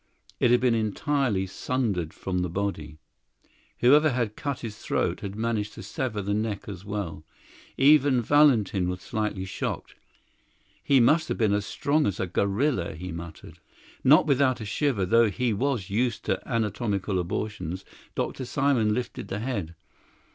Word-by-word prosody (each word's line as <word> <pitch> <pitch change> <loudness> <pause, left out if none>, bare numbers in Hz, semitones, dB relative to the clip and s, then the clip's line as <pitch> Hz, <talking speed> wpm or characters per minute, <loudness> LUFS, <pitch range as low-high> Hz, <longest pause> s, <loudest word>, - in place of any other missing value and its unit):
It 125 - +4
had 120 0 +5
been 125 -2 +3
entirely 115 -1 0
sundered 95 -5 -2
from 90 -1 -3
the 90 0 -1
body; 85 -4 -3 0.8
whoever 150 +5 +6
had 120 -5 -1
cut 140 -3 -4
his 110 -3 -6
throat - - -1
had 100 0 -6
managed 110 -2 -2
to - - -8
sever 110 -6 -3
the 100 +1 -1
neck 105 -1 -2
as 95 -3 -7
well. 100 -7 -5 0.5
Even 140 -2 +5
Valentin 115 -9 +3
was 90 0 -3
slightly 105 -3 -3
shocked. 95 - -4 0.9
"He 140 -2 +4
must 155 +7 +4
have - - -2
been 110 -4 +2
as 100 0 -1
strong 150 +2 +1
as 100 - -2
a - - 0
gorilla," 100 - 0
he 90 +3 -6
muttered. 85 -1 -9 0.4
Not 150 +4 +6
without 140 -3 +2
a 110 - -6
shiver, 110 -2 0
though 115 +4 +4
he 120 +3 0
was 115 -4 -1
used 115 +2 0
to - - 0
anatomical 105 -3 -1
abortions, 90 0 -4 0.3
Dr. 130 - -2
Simon 125 -6 +1
lifted 125 +1 -4
the 95 - -3
head. 105 -8 -3
110 Hz, 155 wpm, -26 LUFS, 95-130 Hz, 0.9 s, whoever